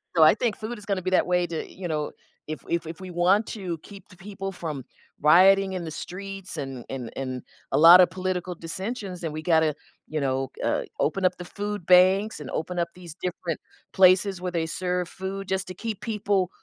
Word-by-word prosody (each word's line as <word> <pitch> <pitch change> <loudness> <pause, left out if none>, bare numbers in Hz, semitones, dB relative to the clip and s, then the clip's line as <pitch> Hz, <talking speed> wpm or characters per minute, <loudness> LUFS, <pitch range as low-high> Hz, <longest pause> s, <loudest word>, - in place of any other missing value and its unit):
So 160 - +6
I 155 - +8
think 225 -1 0
food 220 +2 -6
is 210 - -12
gonna 195 -2 -1
be 185 - -2
that 185 - +3
way 180 0 +2
to, 165 -2 -5
you 185 -1 -6
know 150 -2 -2 0.4
if 155 0 -5
if 170 -1 -1
if 160 0 -7
we 185 -1 -8
want 185 +5 +3
to 185 -7 -4
keep 200 -1 -13
the 185 - -15
people 195 +1 -6
from 155 -7 -5 0.4
rioting 190 +5 +6
in 185 -2 -3
the 160 - -5
streets 195 +3 -7
and 135 -4 -5
and 130 -3 -5
and 130 -2 -4 0.3
a - - +2
lotta 175 +3 +9
political 185 -1 -3
dissensions, 190 +3 -5
then 165 -3 -3
we 155 +1 -6
gotta, 160 -3 +3 0.3
you 155 - -2
know, 135 -1 -1 0.2
uh, - - +1 0.2
open 185 +5 +1
up 180 0 +2
the 180 - -7
food 205 0 -5
banks 185 +4 +5
and 150 - -7
open 175 +3 -3
up 170 - +1
these 175 -3 -10
different 175 -2 -3 0.3
places 190 0 +5
where 180 0 -2
they 165 -2 0
serve 180 +1 -2
food 190 +2 -6
just 190 -1 -1
to 185 - -7
keep 220 +1 -5
people 205 -4 0
180 Hz, 210 wpm, -26 LUFS, 165-195 Hz, 0.4 s, lotta